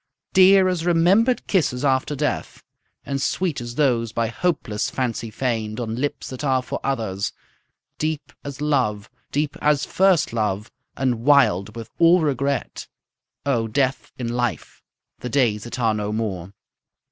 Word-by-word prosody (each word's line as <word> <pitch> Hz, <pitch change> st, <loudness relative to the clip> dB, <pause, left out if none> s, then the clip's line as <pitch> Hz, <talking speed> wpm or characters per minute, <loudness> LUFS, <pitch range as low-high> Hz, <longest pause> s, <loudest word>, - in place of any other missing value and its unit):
Dear 190 Hz, 0 st, +7 dB
as 180 Hz, -3 st, -1 dB
remember'd 180 Hz, +9 st, +3 dB
kisses 145 Hz, -8 st, 0 dB
after 135 Hz, +2 st, +1 dB
death, -, -, -3 dB, 0.4 s
And 140 Hz, -1 st, -2 dB
sweet 170 Hz, -1 st, -1 dB
as 120 Hz, 0 st, -7 dB
those 120 Hz, -6 st, +1 dB
by 115 Hz, 0 st, -1 dB
hopeless 115 Hz, -5 st, -1 dB
fancy 115 Hz, -3 st, -2 dB
feign'd 110 Hz, -2 st, -2 dB
On 115 Hz, -2 st, -3 dB
lips 140 Hz, +4 st, -3 dB
that 130 Hz, +2 st, -7 dB
are 130 Hz, -2 st, +1 dB
for -, -, -4 dB
others; 110 Hz, -8 st, -2 dB, 0.7 s
deep 155 Hz, -1 st, -3 dB
as 140 Hz, 0 st, -7 dB
love, 125 Hz, -8 st, 0 dB, 0.2 s
Deep 145 Hz, 0 st, -1 dB
as 150 Hz, -2 st, +2 dB
first 185 Hz, -9 st, +2 dB
love, 105 Hz, -2 st, -1 dB, 0.3 s
and 125 Hz, -4 st, 0 dB
wild 110 Hz, -8 st, +3 dB
with 115 Hz, -1 st, -8 dB
all 170 Hz, +1 st, +6 dB
regret; 140 Hz, -3 st, -1 dB, 0.6 s
O 120 Hz, -5 st, +1 dB
Death 130 Hz, +2 st, -1 dB
in 120 Hz, -2 st, -3 dB
Life, 120 Hz, -8 st, -3 dB, 0.4 s
the 125 Hz, -, -5 dB
days 115 Hz, -5 st, +1 dB
that 120 Hz, -, -6 dB
are 115 Hz, -3 st, +2 dB
no 105 Hz, -1 st, -2 dB
more. 100 Hz, -5 st, -3 dB
130 Hz, 145 wpm, -22 LUFS, 115-145 Hz, 0.7 s, Dear